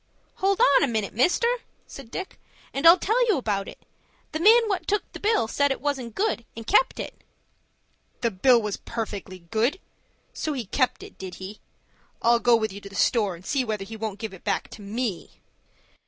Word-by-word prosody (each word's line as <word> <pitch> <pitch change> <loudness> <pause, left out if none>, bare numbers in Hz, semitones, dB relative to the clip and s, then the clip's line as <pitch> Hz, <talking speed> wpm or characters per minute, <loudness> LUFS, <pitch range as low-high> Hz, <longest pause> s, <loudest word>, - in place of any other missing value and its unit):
"Hold 390 +1 +1
on 285 - +5
a - - +3
minute, 220 -5 -2
mister," 350 - +3 0.4
said 270 -4 -11
Dick, 380 +9 -6 0.3
"and 275 +4 +3
I'll 340 +2 +10
tell 450 +7 +2
you 435 - +4
all - - +1
about 200 -5 -2
it. - - -9 0.5
The 315 - -3
man 450 +6 +6
what 390 -3 -2
took 415 0 +1
the - - -8
bill 420 - +2
said 285 +5 +1
it 270 - -1
wasn't 265 -6 -3
good, 410 - 0
and 225 - -7
kept 425 - +3
it." - - -7 1.0
"The 235 -2 +1
bill 235 +6 +5
was 210 -3 -3
perfectly 205 -5 -5
good. 240 +11 +1 0.5
So 310 - -2
he 250 -5 -4
kept 255 +6 0
it, - - -13
did 185 -2 -7
he? 190 +3 -9 0.6
I'll 235 0 +4
go 240 0 +5
with 220 -3 -1
you 200 - -9
to 200 - -10
the 195 - -12
store, 205 -6 +2
and 175 +2 -15
see 275 +2 +1
whether 215 -4 -3
he 225 - -8
won't 215 -2 -4
give 215 -1 -6
it 190 - -13
back 200 -2 -1
to - - -11
me." 210 -1 -4
235 Hz, 205 wpm, -25 LUFS, 210-300 Hz, 1.0 s, I'll